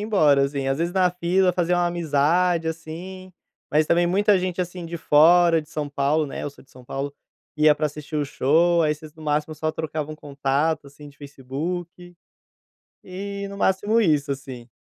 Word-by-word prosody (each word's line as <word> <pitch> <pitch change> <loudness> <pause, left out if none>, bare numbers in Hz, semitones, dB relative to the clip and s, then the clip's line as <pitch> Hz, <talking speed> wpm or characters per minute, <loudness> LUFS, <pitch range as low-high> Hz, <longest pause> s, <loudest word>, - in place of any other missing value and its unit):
embora, 155 -10 +3
assim. 140 -1 -2
Às 135 +2 0
vezes 170 +1 -1
na 185 -1 +3
fila 180 +1 +2
fazia 175 0 +1
uma 175 0 +2
amizade, 170 +1 +1
assim, 175 +4 -7 0.4
mas 155 0 +3
também 175 +1 +3
muita 200 +3 +3
gente, 185 0 -2
assim, 180 0 -5
de 170 +1 -5
fora, 165 +2 +5
de 150 - -20
São 150 -2 -3
Paulo, 145 +2 0
né, - - -6
eu 145 - -4
sou 140 - -19
de - - -27
São 125 -1 -15
Paulo, 140 +2 -5 0.4
ia 150 0 +5
pra 150 +1 -1
assistir 150 +1 -7
o 145 - 0
show, 165 +5 +2
aí 150 -1 +2
vocês 155 0 -11
no 160 - -13
máximo 150 +1 -1
só 155 +1 -2
trocavam 155 -1 -5
contato, 140 +1 -1
assim, 145 +1 -13
de 145 - -18
Facebook, 170 +6 -6 0.9
e 200 +2 -6
no 200 - -8
máximo 205 +4 +2
isso, 150 -6 +1
assim. 130 -3 -10
160 Hz, 185 wpm, -23 LUFS, 145-175 Hz, 0.9 s, fora